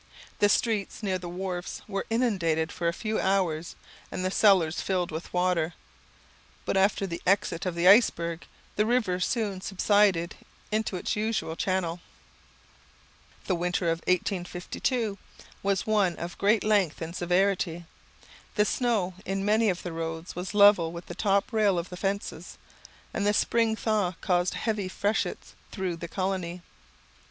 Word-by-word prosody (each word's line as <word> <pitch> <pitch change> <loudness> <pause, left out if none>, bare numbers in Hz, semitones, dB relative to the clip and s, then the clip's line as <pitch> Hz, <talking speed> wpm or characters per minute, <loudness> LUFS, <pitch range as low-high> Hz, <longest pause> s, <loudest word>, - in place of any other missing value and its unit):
The 205 - +5
streets 215 0 0
near 190 -2 0
the 175 -1 -7
wharfs 180 0 -5
were 195 -2 -3
inundated 185 -9 +1
for 170 - -2
a - - +3
few 215 +5 -2
hours, 175 -4 0 0.4
and 185 - -3
the 185 - 0
cellars 190 -6 +4
filled 180 -3 -1
with 160 +2 -6
water; 180 -2 +1 0.9
but - - -1
after 195 +1 +2
the 170 -3 -5
exit 185 -2 +1
of 180 - -2
the 170 +1 +2
iceberg, 170 -6 +4 0.3
the 210 +1 +2
river 225 -7 +1
soon 200 -1 -1
subsided 195 -2 +2 0.4
into 215 -2 -1
its 180 - -2
usual 210 -6 -1
channel. 180 -2 -1 1.5
The 190 - 0
winter 175 0 0
of 165 - -1
1852 190 +4 -1 0.4
was 195 -1 0
one 205 -5 +2
of 170 +1 -6
great 210 +2 +3
length 205 -7 +2
and 165 +1 -6
severity. 180 -1 +1 0.7
The 210 - +3
snow 215 -7 0
in 195 +1 -2
many 215 +1 +3
of 180 -2 -2
the 175 - -5
roads 165 +1 -5
was 180 +3 -5
level 200 -5 +6
with 170 0 -8
the - - -7
top 200 +4 +1
rail 210 -4 +3
of 170 +1 -3
the 180 - -7
fences, 195 +2 -4 0.6
and 200 - -1
the 205 0 +3
spring 230 0 +2
thaw 210 -5 0
caused 180 -2 +1
heavy 210 -4 -1
freshets 205 +3 -2 0.2
through 185 -4 -3
the 170 - -6
colony. 185 -1 -3
185 Hz, 150 wpm, -27 LUFS, 175-205 Hz, 1.5 s, level